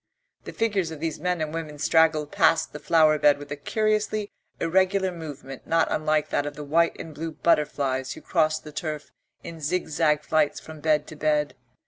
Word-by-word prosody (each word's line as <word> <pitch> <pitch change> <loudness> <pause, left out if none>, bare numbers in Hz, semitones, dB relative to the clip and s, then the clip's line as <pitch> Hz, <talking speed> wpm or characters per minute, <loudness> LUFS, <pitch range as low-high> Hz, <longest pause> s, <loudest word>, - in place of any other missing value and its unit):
The - - -6
figures 205 -7 0
of 160 -2 -8
these 160 -1 -3
men 180 -2 -1
and 155 0 -3
women 155 -2 -5
straggled 155 0 +2
past 170 -4 +2
the 150 - -6
flower 155 0 +4
bed 145 -1 +5
with 145 0 -11
a - - -2
curiously 215 +5 -1 0.3
irregular 190 +2 +2
movement 145 -6 -9
not 165 0 +2
unlike 155 -1 +1
that 145 - 0
of 145 - -6
the 150 - -7
white 165 +4 +1
and 160 - -8
blue 160 +2 -5
butterflies 140 -5 0
who - - -12
crossed 155 -3 +1
the 150 - -9
turf 155 -2 -5 0.3
in 165 -1 -9
zig 170 +4 -1
zag 150 -1 +1
flights 155 -2 +1
from 160 -1 -11
bed 150 -1 +2
to 155 - -10
bed. 150 -2 0
155 Hz, 190 wpm, -25 LUFS, 150-170 Hz, 0.3 s, bed